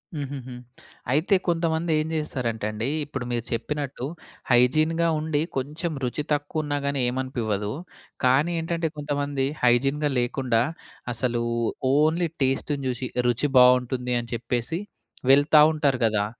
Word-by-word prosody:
హూహూహు. 135 Hz, -3 st, -5 dB, 0.6 s
అయితే 160 Hz, +8 st, +3 dB
కొంతమంది 165 Hz, -1 st, 0 dB
ఏం 155 Hz, -, -1 dB
చేస్తారంటే 120 Hz, -8 st, -2 dB
అండి 110 Hz, +4 st, -3 dB, 0.2 s
ఇప్పుడు 140 Hz, -4 st, -5 dB
మీరు 120 Hz, -1 st, -1 dB
చెప్పినట్టు 140 Hz, +1 st, -3 dB, 0.5 s
హైజీన్‌గా 155 Hz, +7 st, +3 dB
ఉండి 155 Hz, -1 st, 0 dB, 0.2 s
కొంచెం 155 Hz, +6 st, -3 dB
రుచి 125 Hz, +4 st, -2 dB
తక్కువున్నా‌గానీ 145 Hz, -2 st, -2 dB
ఏమనిపివ్వదు. 120 Hz, -5 st, -2 dB, 0.5 s
కానీ 135 Hz, +7 st, +3 dB
ఏంటంటే 165 Hz, 0 st, -1 dB
కొంతమంది 145 Hz, -2 st, -1 dB, 0.2 s
హైజీన్‌గా 135 Hz, +5 st, +3 dB
లేకుండా 120 Hz, -1 st, +1 dB, 0.5 s
అసలు 120 Hz, 0 st, -1 dB, 0.5 s
ఓన్లీ 160 Hz, +3 st, +2 dB
టేస్ట్‌ని 140 Hz, +2 st, 0 dB
జూసి 125 Hz, 0 st, -3 dB
ఇక 125 Hz, -, -1 dB
రుచి 120 Hz, +4 st, +1 dB
బావుంటుంది 125 Hz, 0 st, +4 dB
అని 120 Hz, 0 st, -8 dB
చెప్పేసి 120 Hz, +7 st, -2 dB, 0.5 s
వెళ్తా 145 Hz, +2 st, +6 dB
ఉంటారు 140 Hz, -4 st, +1 dB
గదా! 105 Hz, -2 st, +1 dB
135 Hz, 115 wpm, -25 LUFS, 125-150 Hz, 0.6 s, వెళ్తా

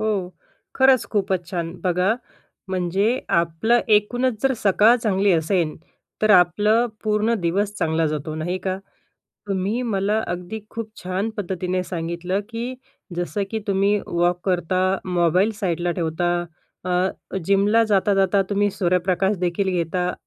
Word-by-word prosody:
हो, 205 Hz, -4 st, -1 dB, 0.5 s
खरंच 265 Hz, -1 st, +5 dB
खूपचं 190 Hz, -4 st, 0 dB
छान. 170 Hz, -2 st, -3 dB
बघा, 180 Hz, +4 st, +2 dB, 0.5 s
म्हणजे 185 Hz, +2 st, 0 dB, 0.3 s
आपलं 170 Hz, +9 st, +1 dB
एकूणचं 225 Hz, +4 st, +2 dB
जर 270 Hz, -, +2 dB
सकाळ 210 Hz, +4 st, +5 dB
चांगली 200 Hz, -4 st, +2 dB
असेल, 165 Hz, -1 st, +1 dB, 0.5 s
तर 215 Hz, -, +4 dB
आपलं 210 Hz, +5 st, +4 dB, 0.2 s
पूर्ण 215 Hz, +2 st, +2 dB
दिवस 195 Hz, +4 st, 0 dB
चांगला 160 Hz, 0 st, +1 dB
जातो 155 Hz, 0 st, -3 dB
नाही 175 Hz, +4 st, -2 dB
का? 190 Hz, 0 st, -1 dB, 0.7 s
तुम्ही 200 Hz, +5 st, -1 dB
मला 205 Hz, 0 st, +1 dB
अगदी 180 Hz, +5 st, -5 dB
खूप 230 Hz, -1 st, -6 dB
छान 185 Hz, +4 st, -2 dB
पद्धतीने 185 Hz, -2 st, -2 dB
सांगितलं, 175 Hz, +2 st, -3 dB
की 240 Hz, +2 st, -4 dB, 0.4 s
जसं 175 Hz, +4 st, -2 dB
की 225 Hz, -, -1 dB
तुम्ही 200 Hz, +1 st, +2 dB
वॉक 175 Hz, +1 st, +1 dB
करता, 185 Hz, -1 st, 0 dB, 0.2 s
मोबाईल 180 Hz, +3 st, +2 dB
साईडला 175 Hz, -2 st, 0 dB
ठेवता. 170 Hz, +1 st, 0 dB, 0.5 s
अ, 180 Hz, +1 st, -2 dB
जिमला 200 Hz, +4 st, +3 dB
जाता 205 Hz, -1 st, +2 dB
जाता 195 Hz, 0 st, +3 dB
तुम्ही 205 Hz, 0 st, +2 dB
सूर्यप्रकाशदेखील 185 Hz, 0 st, 0 dB
घेता 180 Hz, 0 st, -1 dB
190 Hz, 125 wpm, -22 LUFS, 175-210 Hz, 0.7 s, खरंच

